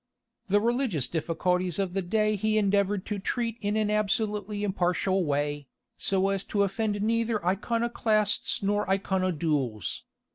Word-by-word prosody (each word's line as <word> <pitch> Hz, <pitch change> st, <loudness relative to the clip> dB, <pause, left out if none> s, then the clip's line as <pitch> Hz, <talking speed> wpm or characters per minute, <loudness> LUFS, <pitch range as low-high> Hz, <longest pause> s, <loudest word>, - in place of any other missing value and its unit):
The 205 Hz, +1 st, +4 dB
religious 230 Hz, -, +1 dB
difficulties 175 Hz, +3 st, 0 dB
of 195 Hz, -3 st, -1 dB
the 195 Hz, -, 0 dB
day 215 Hz, +4 st, +1 dB
he 215 Hz, +2 st, +1 dB
endeavoured 200 Hz, -1 st, +1 dB
to 210 Hz, -2 st, -3 dB
treat 230 Hz, +3 st, -2 dB
in 205 Hz, 0 st, 0 dB
an 215 Hz, -1 st, +1 dB
absolutely 210 Hz, 0 st, 0 dB
impartial 185 Hz, -1 st, +1 dB
way, 145 Hz, -1 st, -1 dB, 0.3 s
so 195 Hz, 0 st, +1 dB
as 195 Hz, -1 st, -1 dB
to 200 Hz, -1 st, +1 dB
offend 205 Hz, +1 st, -1 dB
neither 230 Hz, -2 st, 0 dB
Iconoclasts 215 Hz, +1 st, 0 dB
nor 205 Hz, 0 st, 0 dB
Iconodules. 165 Hz, -, 0 dB
200 Hz, 135 wpm, -28 LUFS, 180-215 Hz, 0.3 s, The